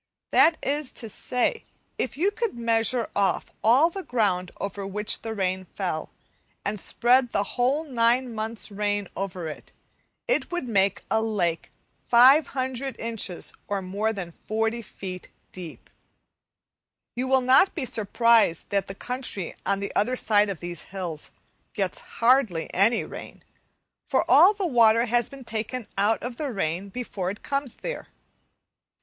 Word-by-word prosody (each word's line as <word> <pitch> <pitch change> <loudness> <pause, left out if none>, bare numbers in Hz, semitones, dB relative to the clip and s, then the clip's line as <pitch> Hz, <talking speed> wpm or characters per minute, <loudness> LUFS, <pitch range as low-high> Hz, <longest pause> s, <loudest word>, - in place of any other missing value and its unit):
That 325 0 +5
is 290 0 0
to 230 - -3
say, 250 - -1 0.4
if 260 - -2
you 380 +6 +2
could 440 - -3
measure 230 0 0
off 195 -2 +1
all 265 +10 +5
the 390 - -5
ground 200 - 0
over 200 0 -4
which 210 +2 -2
the 225 -1 -5
rain 185 -1 -1
fell, 175 -5 -3 0.6
and 205 0 -2
spread 245 +5 +3
the 200 - +1
whole 255 +8 0
nine 245 -2 +1
months' 220 0 -4
rain 205 -1 -1
over 185 -3 -4
it, 155 - -9 0.6
it - - 0
would 350 -7 -3
make 195 -3 +1
a 220 +1 +3
lake 185 -7 -1 0.4
500 260 0 +4
inches, 225 -6 -3
or 200 -1 -2
more 200 +4 -1
than 190 -5 -6
40 225 +5 -2
feet 185 -4 -8 0.2
deep! 175 -3 -9 1.3
You 250 +2 -2
will 265 0 +4
not 260 +9 +5
be 305 -7 -2
surprised 225 -5 +2
that 200 -1 +1
the 195 - -7
country 250 -7 -3
on 200 0 +1
the 200 - -4
other 240 +5 +2
side 210 -4 +3
of 190 -5 -5
these 175 -2 -5
hills 180 -5 -5 0.4
gets - - -2
hardly 230 - +1
any 220 +5 +3
rain, - - -10 0.7
for - - +2
all 400 +4 +7
the 395 -1 -2
water 230 -5 +5
has 240 -1 +1
been 275 -2 -11
taken 225 +2 -4
out 205 +3 +1
of 240 0 -5
the 305 - -3
air 185 - -1
before 195 -4 -4
it 205 - -7
comes 275 -3 -2
there. - - -6
225 Hz, 150 wpm, -25 LUFS, 195-255 Hz, 1.3 s, all